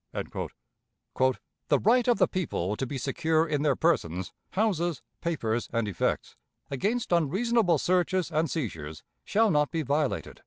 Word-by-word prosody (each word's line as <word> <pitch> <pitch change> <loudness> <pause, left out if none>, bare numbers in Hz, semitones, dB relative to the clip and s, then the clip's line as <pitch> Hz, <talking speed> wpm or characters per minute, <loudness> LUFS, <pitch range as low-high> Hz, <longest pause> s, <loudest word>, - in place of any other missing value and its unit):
"The - - -4 1.3
right 240 +3 +3
of 240 - +4
the - - +4
people 105 - -2
to 135 - -3
be 140 - -4
secure 155 +5 +1
in 150 -2 0
their 145 -3 +2
persons, 90 - 0 0.2
houses, 175 -7 0 0.2
papers, 120 -9 -1
and 115 -2 0
effects, 95 -5 -1 0.4
against 210 - -1
unreasonable 180 - +3
searches 180 +2 +1
and 155 +1 +1
seizures 80 - -4 0.2
shall 220 0 +3
not 150 -2 +3
be 165 -2 -2
violated." 145 +1 -1
160 Hz, 140 wpm, -28 LUFS, 130-185 Hz, 1.3 s, of